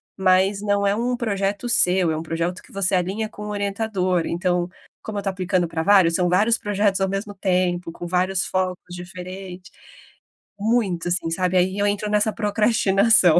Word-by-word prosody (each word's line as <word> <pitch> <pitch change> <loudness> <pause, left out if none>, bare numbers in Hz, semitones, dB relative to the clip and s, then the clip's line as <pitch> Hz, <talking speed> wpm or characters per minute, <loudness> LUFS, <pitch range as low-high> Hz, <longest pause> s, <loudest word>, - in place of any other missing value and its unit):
mas 190 +1 +2
não 205 -1 +1
é 200 - +2
um 245 +2 -1
projeto 205 -1 -2
seu, 180 -6 +3
é 155 - -2
um 160 - -4
projeto 165 +2 -3
que - - -19
você 195 -1 0
alinha 190 +5 -1
com 210 -1 -10
o - - -5
orientador. 200 -3 -1
Então, 175 0 -1 0.3
como 215 -1 -6
eu - - 0
estou 195 -1 -2
aplicando 185 -1 0
pra 160 0 -3
vários, 185 -3 +5
são 180 0 +1
vários 215 +6 +3
projetos 205 -1 0
ao 190 - +1
mesmo 200 +2 -4
tempo, 180 -3 0
com 175 - -8
vários 185 +1 0
focos 185 -1 -3
diferente. 180 +1 -9 0.9
Muito 205 -6 0
assim, 175 -2 0
sabe, 185 +2 +1
aí 185 +2 +1
eu 205 - +2
entro 205 +1 -1
nessa 210 +1 +2
procrastinação. 210 -4 +4
190 Hz, 180 wpm, -22 LUFS, 180-205 Hz, 0.9 s, vários